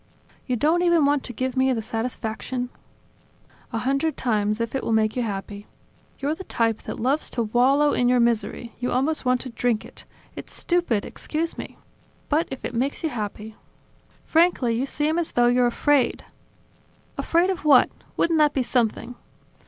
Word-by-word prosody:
"You 250 Hz, -, 0 dB
don't 315 Hz, +8 st, +2 dB
even 345 Hz, -4 st, +4 dB
want 285 Hz, -1 st, +2 dB
to -, -, -4 dB
give 255 Hz, +2 st, -3 dB
me 260 Hz, 0 st, +3 dB
the 225 Hz, -, -2 dB
satisfaction... 230 Hz, +2 st, -3 dB, 0.5 s
?" -, -, -32 dB
"A 230 Hz, -, -2 dB
hundred 275 Hz, +5 st, 0 dB
times, 210 Hz, -3 st, 0 dB
if 230 Hz, -1 st, -2 dB
it 270 Hz, -, -2 dB
will -, -, -2 dB
make 220 Hz, -1 st, +2 dB
you 250 Hz, -, 0 dB
happy. 205 Hz, -1 st, -5 dB, 0.5 s
You're 285 Hz, +2 st, -1 dB
the 380 Hz, -, -7 dB
type 225 Hz, -, 0 dB
that -, -, -7 dB
loves 270 Hz, +6 st, 0 dB
to 235 Hz, -, -1 dB
wallow 265 Hz, +6 st, +3 dB
in 245 Hz, 0 st, +2 dB
your 250 Hz, 0 st, +4 dB
misery, 235 Hz, 0 st, 0 dB
you 250 Hz, 0 st, -2 dB
almost 275 Hz, +4 st, 0 dB
want 250 Hz, 0 st, +2 dB
to 260 Hz, -, -6 dB
drink 235 Hz, -2 st, -1 dB
it... -, -, -12 dB, 0.3 s
It's -, -, -7 dB
stupid, 345 Hz, -, 0 dB
excuse 325 Hz, +2 st, -3 dB
me!... -, -, -8 dB, 0.5 s
But 310 Hz, +3 st, +2 dB
if 265 Hz, -, -6 dB
it -, -, -4 dB
makes 260 Hz, +7 st, -1 dB
you 320 Hz, -, +1 dB
happy.. 215 Hz, -2 st, -5 dB, 0.4 s
." -, -, -34 dB
"Frankly, 325 Hz, -8 st, +3 dB
you 260 Hz, +4 st, -1 dB
seem 305 Hz, +4 st, 0 dB
as 335 Hz, -, -2 dB
though 240 Hz, -, +4 dB
you're 245 Hz, 0 st, +4 dB
afraid." 275 Hz, +2 st, +1 dB, 0.9 s
"Afraid 345 Hz, +3 st, +2 dB
of 370 Hz, -, -5 dB
what? 285 Hz, -4 st, +6 dB, 0.3 s
Wouldn't 330 Hz, -1 st, +2 dB
that 300 Hz, -1 st, +4 dB
be 265 Hz, -, +2 dB
something!" 240 Hz, -1 st, -1 dB
250 Hz, 185 wpm, -24 LUFS, 230-295 Hz, 0.9 s, what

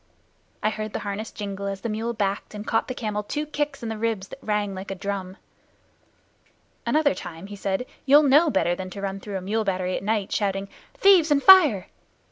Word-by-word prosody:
I 215 Hz, -, +2 dB
heard 215 Hz, -1 st, -5 dB
the -, -, -3 dB
harness 205 Hz, +2 st, -4 dB
jingle 200 Hz, -1 st, -5 dB
as 195 Hz, -1 st, -4 dB
the -, -, -3 dB
mule 225 Hz, +2 st, -2 dB
backed 205 Hz, -1 st, -2 dB
and 210 Hz, 0 st, -6 dB
caught 225 Hz, -1 st, 0 dB
the 255 Hz, -, -4 dB
camel 210 Hz, -3 st, -2 dB
two 295 Hz, +8 st, -3 dB
kicks 295 Hz, -3 st, -3 dB
in 230 Hz, -, -3 dB
the 220 Hz, -1 st, -5 dB
ribs 220 Hz, -4 st, -2 dB
that 270 Hz, -, -11 dB
rang 210 Hz, -2 st, -1 dB
like 190 Hz, +1 st, -7 dB
a 195 Hz, -, -3 dB
drum. 195 Hz, 0 st, -5 dB, 1.5 s
"Another 300 Hz, -1 st, +3 dB
time," 165 Hz, +2 st, -8 dB
he 205 Hz, +1 st, -8 dB
said, 195 Hz, +4 st, -2 dB, 0.2 s
"you'll 290 Hz, +3 st, +7 dB
know 295 Hz, +4 st, +5 dB
better 175 Hz, -, +1 dB
than 185 Hz, +1 st, -5 dB
to 200 Hz, +1 st, -8 dB
run 195 Hz, 0 st, -3 dB
through 200 Hz, -1 st, -5 dB
a -, -, -5 dB
mule 215 Hz, +4 st, -1 dB
battery 185 Hz, -2 st, -1 dB
at -, -, -3 dB
night, 210 Hz, -1 st, -1 dB
shouting 195 Hz, -1 st, -1 dB, 0.3 s
`Thieves 375 Hz, -5 st, +6 dB
and 285 Hz, -2 st, +3 dB
fire! 310 Hz, -, +7 dB
210 Hz, 210 wpm, -24 LUFS, 195-240 Hz, 1.5 s, you'll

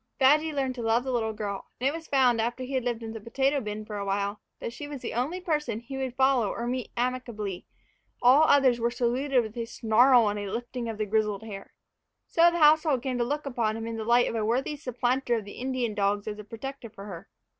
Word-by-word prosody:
Badgy 300 Hz, +4 st, +4 dB
learned 270 Hz, -3 st, -1 dB
to 250 Hz, -, -6 dB
love 230 Hz, +1 st, +2 dB
the 260 Hz, -, -3 dB
little 225 Hz, -3 st, 0 dB
girl; 205 Hz, -2 st, -5 dB
and 255 Hz, -, +1 dB
it 280 Hz, -, +1 dB
was 325 Hz, 0 st, -7 dB
found, 250 Hz, -4 st, +3 dB
after 240 Hz, +3 st, -2 dB
he 260 Hz, +2 st, -6 dB
had 260 Hz, -2 st, 0 dB
lived 235 Hz, -2 st, -2 dB
in 225 Hz, 0 st, -6 dB
the 225 Hz, -, -7 dB
potato 270 Hz, +6 st, +1 dB
bin 210 Hz, -1 st, -5 dB
for 210 Hz, -1 st, -6 dB
a 200 Hz, -, -3 dB
while, 200 Hz, +1 st, -2 dB, 0.2 s
that 230 Hz, -, -5 dB
she 290 Hz, +3 st, -7 dB
was 285 Hz, -3 st, -8 dB
the -, -, -4 dB
only 275 Hz, +10 st, -1 dB
person 300 Hz, -10 st, -1 dB
he 240 Hz, +4 st, -8 dB
would 260 Hz, -2 st, -3 dB
follow 265 Hz, -5 st, +3 dB
or 235 Hz, -, -4 dB
meet 250 Hz, -1 st, -3 dB
amicably; 235 Hz, -6 st, -3 dB, 0.5 s
all 265 Hz, +6 st, +6 dB
others 265 Hz, -5 st, +4 dB
were 235 Hz, +1 st, +1 dB
saluted 250 Hz, +2 st, +1 dB
with 220 Hz, -1 st, -8 dB
a 235 Hz, -1 st, -3 dB
snarl 230 Hz, +1 st, +4 dB
and 205 Hz, 0 st, -1 dB
a 205 Hz, -1 st, -4 dB
lifting 240 Hz, 0 st, -4 dB
of 220 Hz, -, -5 dB
the 215 Hz, -, -1 dB
grizzled 210 Hz, 0 st, 0 dB
hair. 200 Hz, -3 st, -9 dB, 0.5 s
So 340 Hz, +1 st, +5 dB
the 345 Hz, -, -2 dB
household 305 Hz, -4 st, +4 dB
came 255 Hz, -2 st, -2 dB
to -, -, +3 dB
look 290 Hz, +5 st, -2 dB
upon 230 Hz, -5 st, -1 dB
him 225 Hz, -, -5 dB
in 230 Hz, 0 st, -4 dB
the 220 Hz, -, -3 dB
light 240 Hz, +2 st, +4 dB
of -, -, -3 dB
a 225 Hz, -2 st, -1 dB
worthy 250 Hz, +7 st, 0 dB
supplanter 250 Hz, -2 st, 0 dB
of 220 Hz, -3 st, -3 dB
the 205 Hz, -, -9 dB
Indian 255 Hz, -3 st, -1 dB
dogs 205 Hz, 0 st, 0 dB
as 210 Hz, 0 st, -4 dB
a -, -, -7 dB
protector 235 Hz, +3 st, -7 dB
for 200 Hz, -2 st, -11 dB
her. 185 Hz, -5 st, -9 dB
240 Hz, 245 wpm, -27 LUFS, 220-265 Hz, 0.5 s, all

